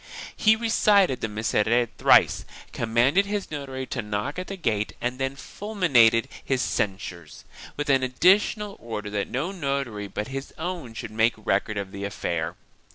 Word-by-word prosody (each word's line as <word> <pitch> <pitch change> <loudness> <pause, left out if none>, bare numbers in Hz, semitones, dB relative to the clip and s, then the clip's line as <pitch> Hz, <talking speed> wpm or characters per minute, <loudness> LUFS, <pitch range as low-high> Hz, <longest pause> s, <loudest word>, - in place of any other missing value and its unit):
He 220 0 +5
recited 210 - +3
the - - 0
Miserere 110 +2 +1
thrice, - - +5 0.3
commanded 120 - +2
his 205 -3 -3
notary 135 -3 -5
to 130 - -3
knock 105 - -3
at 185 - -5
the 195 - -5
gate 105 - -1
and 125 +2 -3
then 135 0 -1
fulminated 140 - +2 0.2
his 130 -2 0
censures, 95 -7 -3 0.3
with 145 - -2
an 135 -2 +4
additional 200 - +2
order 105 -3 -5
that 100 -1 -1
no 145 +9 -2
notary 140 - -3
but 105 +4 -5
his 135 +1 -6
own 165 -8 -5
should 110 - -6
make 110 +2 +2
record 105 0 -1
of 100 -1 -4
the 100 0 -7
affair. 85 -4 -3
125 Hz, 160 wpm, -25 LUFS, 105-165 Hz, 0.3 s, He